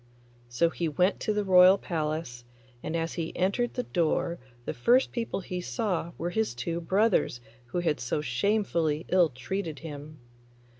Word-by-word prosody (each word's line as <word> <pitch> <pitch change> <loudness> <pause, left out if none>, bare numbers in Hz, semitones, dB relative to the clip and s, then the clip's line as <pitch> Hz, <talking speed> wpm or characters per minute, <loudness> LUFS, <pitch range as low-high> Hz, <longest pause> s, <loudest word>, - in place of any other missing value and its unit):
So 165 +8 +2
he 170 - -2
went 180 +6 +1
to - - -1
the 210 0 0
royal 185 0 +7
palace, 155 -8 -3 0.4
and 160 - -4
as 165 0 -1
he 165 -2 -4
entered 200 +7 0
the 250 - -1
door 170 -2 0 0.3
the - - -2
first 245 - +3
people 230 -4 -3
he 180 0 -4
saw 180 -5 -2
were 175 +1 -3
his 220 - -1
two 170 +7 -3
brothers 195 - +2 0.3
who 175 +9 -2
had 155 -6 0
so 125 +4 -1
shamefully 160 - 0
ill 180 -3 +4
treated 155 +6 -4
him. 150 0 -8
170 Hz, 160 wpm, -28 LUFS, 155-195 Hz, 0.4 s, royal